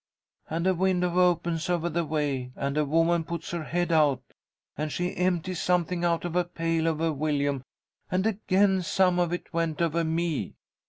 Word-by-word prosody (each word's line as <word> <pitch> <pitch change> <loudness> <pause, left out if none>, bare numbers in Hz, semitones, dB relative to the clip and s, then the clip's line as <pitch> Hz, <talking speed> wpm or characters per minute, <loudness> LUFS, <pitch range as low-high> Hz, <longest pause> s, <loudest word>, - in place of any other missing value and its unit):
And 165 +2 -2
a 190 - +4
window 180 -1 +1
opens 170 -2 +1
over 175 -1 +1
the 170 0 0
way, 145 -5 -2
and 140 0 -2
a 150 0 +2
woman 165 +3 +2
puts 170 0 -5
her 170 -2 -3
head 175 +1 -1
out, 145 -5 +3 0.5
and 155 +1 -3
she 180 +3 -2
empties 180 -1 0
something 180 -1 +1
out 170 0 +1
of 175 -1 -4
a 180 - +3
pail 165 -1 -1
over 160 0 0
Willyum, 145 -2 0 0.5
and 185 +2 0
again 195 -2 +2
some 180 0 +2
of 175 -1 +1
it 175 - -5
went 165 -2 -1
over 170 0 +1
me. 165 -1 -1
170 Hz, 175 wpm, -27 LUFS, 155-180 Hz, 0.5 s, a